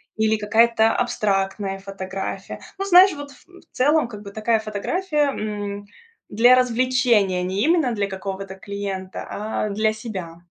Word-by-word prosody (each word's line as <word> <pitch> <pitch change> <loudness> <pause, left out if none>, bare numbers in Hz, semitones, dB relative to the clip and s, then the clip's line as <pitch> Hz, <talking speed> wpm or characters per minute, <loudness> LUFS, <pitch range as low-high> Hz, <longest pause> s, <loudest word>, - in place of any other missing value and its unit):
или 220 0 +2
какая-то 225 +1 +3
абстрактная 195 -4 -1
фотография. 195 0 -6 0.2
Ну, 390 - -3
знаешь, 370 0 +7
вот, 285 -1 -8 0.2
м, 365 0 -17
в - - -31
целом, 295 +1 +3
как 210 -3 -9
бы, 200 - -9
такая 220 +1 +1
фотография, 295 - -1
м, 205 -1 -5 0.4
для 240 +4 +5
развлечения, 245 -6 +2
не 190 +3 -1
именно 310 -5 +2
для 205 -2 -1
какого-то 195 0 -6
клиента, 195 -1 -6
а 215 0 -3
для 215 +2 +1
себя. 185 -7 -7
215 Hz, 140 wpm, -22 LUFS, 195-250 Hz, 0.4 s, знаешь